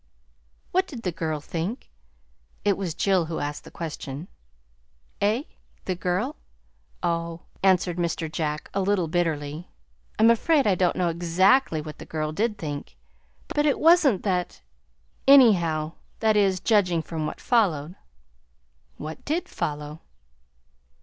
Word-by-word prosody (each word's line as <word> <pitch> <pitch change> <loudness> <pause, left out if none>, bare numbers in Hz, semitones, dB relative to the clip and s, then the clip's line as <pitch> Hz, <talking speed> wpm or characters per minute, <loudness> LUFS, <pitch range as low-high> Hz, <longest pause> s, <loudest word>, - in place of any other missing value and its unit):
"What 375 +1 +2
did 240 -6 -9
the 180 - -1
girl 160 -2 -3
think?" 170 - -5 0.7
It 200 -1 +4
was 180 -5 -4
Jill 190 -4 +2
who 160 0 -4
asked 145 0 -4
the - - -10
question. 155 -1 -6 0.9
"Eh? 215 +6 +2 0.4
The 185 - 0
girl? 185 - -2 0.7
Oh," 170 -1 -1 0.2
answered 185 -2 +3
Mr. 170 -1 -1
Jack, 155 -2 -3
a 195 - 0
little 190 -3 +1
bitterly, 160 -1 -2 0.5
"I'm 225 +2 +6
afraid 285 +5 +3
I 205 - +4
don't 180 -1 +1
know 180 -2 +1
exactly 175 - +3
what 150 -1 -9
the - - -10
girl 155 -1 -2
did 210 +6 -1
think, 145 -4 -6 0.5
but 295 0 +1
it 285 - +2
was 340 +2 +6
n't 240 -11 +2
that, 180 - -2 0.6
anyhow 175 - +5 0.3
that 220 -1 +3
is, 195 -3 +3
judging 180 -5 +2
from 160 -2 -3
what - - -6
followed." 175 - +1 1.0
"What 155 +1 -7
did 320 +4 -1
follow?" 150 +1 -4
175 Hz, 135 wpm, -25 LUFS, 160-210 Hz, 1.0 s, I'm